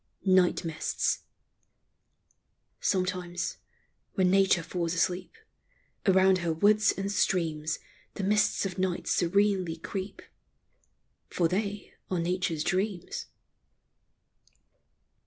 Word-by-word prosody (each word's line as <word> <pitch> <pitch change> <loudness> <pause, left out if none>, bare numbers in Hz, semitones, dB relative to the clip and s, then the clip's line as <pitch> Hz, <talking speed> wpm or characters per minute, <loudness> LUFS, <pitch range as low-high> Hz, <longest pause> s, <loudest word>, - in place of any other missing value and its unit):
NIGHT 185 -2 +3
MISTS. 160 -2 -1 1.6
Sometimes, 180 -2 -1 0.6
when 185 -2 +3
Nature 190 -3 +4
falls 170 0 -2
asleep, 180 - -1 0.7
Around 190 0 +5
her 170 -1 -1
woods 205 +6 +4
and 195 +1 -3
streams 160 -6 0 0.4
The 200 - -4
mists 210 +1 +2
of 190 -1 -4
night 185 -2 -1
serenely 190 -1 +2
creep 190 +4 -6 0.5
— - - -45
For 170 - +3
they 200 +3 -3 0.2
are 185 - 0
Nature's 170 -2 -1
dreams. 190 0 -2
185 Hz, 95 wpm, -29 LUFS, 175-195 Hz, 1.6 s, Around